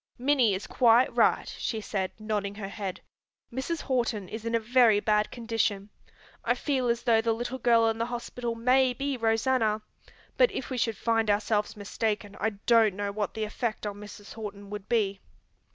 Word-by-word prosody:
"Minnie 250 -5 +3
is 190 - -5
quite 240 0 +4
right," - - +3
she 220 - -2
said, 195 -3 -2
nodding 210 -2 -3
her 200 -2 -6
head. 200 -3 -5 0.5
"Mrs. 290 +6 -3
Horton 235 -7 -1
is 220 +1 -7
in 230 0 0
a - - +3
very 230 -2 +4
bad 210 0 +1
condition. 225 -4 -2 0.5
I - - +2
feel 265 -4 -1
as 235 0 0
though 225 -2 +4
the 225 0 +1
little 240 +3 -4
girl 230 -2 +4
in 225 0 -1
the 230 - 0
hospital 240 0 -4
may 255 +2 +3
be 280 +2 -2
Rosanna, 225 -1 +1 0.5
but - - +5
if 265 - -5
we 255 - -2
should 225 -2 0
find 225 -2 +1
ourselves 210 +1 0
mistaken 205 0 -3
I 220 - +1 0.2
don't 225 -4 +5
know 205 0 -2
what 205 -1 -3
the 220 - -2
effect 215 +1 -3
on 205 -1 -4
Mrs. 205 0 -10
Horton 205 -2 -8
would 210 -1 -7
be. 200 -4 +1
225 Hz, 185 wpm, -28 LUFS, 210-240 Hz, 0.5 s, but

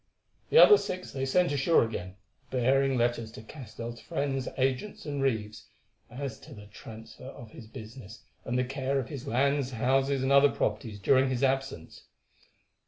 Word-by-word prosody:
The - - +3
other 420 -4 +9
six 185 0 -5
they 135 0 -3
sent 175 +4 +2
ashore 145 +4 +3
again, 95 -5 -5 0.3
bearing 135 +1 +2
letters 120 -2 0
to 110 - -10
Castell's 115 -2 -8
friends, 140 -4 -3
agents, 135 +12 -1
and 145 -2 -3
reeves, 110 -4 -2 0.4
as 130 -1 -6
to 145 -4 -13
the 105 -1 -12
transfer 110 +3 -12
of 120 -4 -10
his 110 - -12
business 110 -2 -11 0.2
and 120 - -2
the 125 - +1
care 135 +1 -2
of 125 - -5
his 140 -2 -7
lands, 140 +1 +1
houses, 135 +2 +1
and 130 - 0
other 140 +1 +6
properties 105 -2 -2
during 130 +6 +3
his 130 0 -2
absence. 135 -10 -2
130 Hz, 165 wpm, -29 LUFS, 115-140 Hz, 0.4 s, other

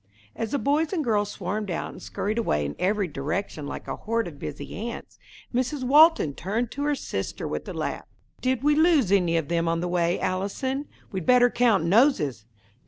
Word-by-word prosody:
As 225 - -3
the 285 - 0
boys 290 +6 +1
and 330 -5 0
girls 210 -4 +1
swarmed 205 +2 -4
out 175 - -3
and - - -12
scurried 215 +3 -2
away 75 - 0
in 70 - -4
every 200 +1 +1
direction 150 +1 -4
like - - -7
a - - -4
horde 230 0 -1
of 150 -4 -10
busy 145 - -6
ants, - - -9 0.3
Mrs. 255 +3 -1
Walton 295 - +6
turned 215 - -2
to 285 - -5
her 295 0 +2
sister - - -4
with - - -4
a - - -5
laugh. - - -4 0.3
"Did 255 -1 0
we 295 +1 +4
lose 305 - +4
any 175 -4 +3
of 160 -3 -1
them 170 0 0
on 165 0 +1
the 175 - -2
way, 175 0 +1
Allison? 230 +10 -2 0.2
We'd 190 -4 -4
better 245 -1 +6
count 230 -7 +3
noses." 170 - +3
210 Hz, 195 wpm, -25 LUFS, 170-260 Hz, 0.3 s, Walton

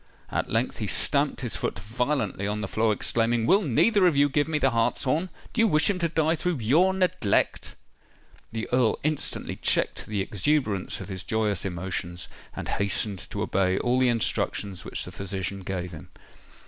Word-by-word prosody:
At - - -2
length - - -1
he - - -2
stamped - - +3
his - - -1
foot - - -3
violently 115 -3 -2
on 105 +1 -2
the 100 - -3
floor, 110 +2 +1
exclaiming, 115 +2 +1
"Will 195 - +4
neither 190 - +3
of 170 - +2
you 145 +1 +4
give 145 +2 +1
me 160 -1 0
the 135 -3 +2
hartshorn? 130 +8 0 0.2
Do 230 - +2
you 225 - +5
wish 155 +1 +3
him 185 - -4
to 170 -2 0
die 160 0 +1
through 180 0 -1
your 150 +12 +3
neglect?" 185 - 0 0.8
The 110 0 -4
Earl 125 -3 +2
instantly 155 -1 -1
checked - - +1
the 105 -2 -2
exuberance 105 -1 0
of - - -8
his 95 -1 -4
joyous 105 -2 -1
emotions, 90 -1 -4 0.3
and - - -5
hastened 100 -1 0
to - - -3
obey 95 0 +1
all 125 +1 +1
the 130 -1 +4
instructions 100 -3 -1
which - - -3
the - - -8
physician 100 0 -4
gave 90 -1 -4
him. 85 +2 -11
115 Hz, 180 wpm, -26 LUFS, 100-150 Hz, 0.8 s, you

